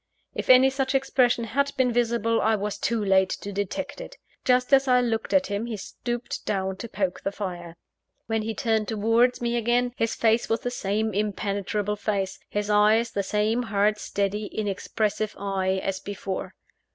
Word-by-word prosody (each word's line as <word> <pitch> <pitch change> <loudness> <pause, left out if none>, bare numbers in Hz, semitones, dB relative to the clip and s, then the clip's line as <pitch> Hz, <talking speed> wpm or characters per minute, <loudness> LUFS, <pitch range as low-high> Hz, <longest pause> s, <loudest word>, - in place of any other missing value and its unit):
If - - -5
any 260 +1 +7
such 270 0 -1
expression 255 -3 +2
had 280 +5 0
been 250 -2 +2
visible, 230 -1 +1
I 220 0 +3
was 210 0 -3
too 225 -3 0
late 190 -1 +4
to 205 - -6
detect 205 +9 -4
it. - - -10 0.3
Just 250 +1 +2
as 270 0 +5
I 250 -1 +5
looked 230 -2 -1
at 280 -1 +4
him 205 +3 -3
he 225 -3 -4
stooped 240 +4 -5
down 190 -2 -2
to 235 - -7
poke 190 -4 -2
the 195 - -2
fire. 175 -4 -6 0.5
When 225 -1 -1
he 220 +1 -3
turned 220 -4 0
towards 225 +4 +2
me 235 0 0
again, 240 +1 +1
his 225 -2 -1
face 225 0 +2
was 225 - +1
the 245 - -3
same 215 -1 -1
impenetrable 205 0 -1
face, 200 -2 -2
his 205 0 -2
eye 210 +2 +4
the 200 - 0
same 210 +4 0
hard, 210 -2 +1
steady, 205 +1 -2
inexpressive 215 +1 -2
eye 190 -1 -1
as 195 -1 -2
before. 195 -1 -5
215 Hz, 175 wpm, -25 LUFS, 200-240 Hz, 0.5 s, any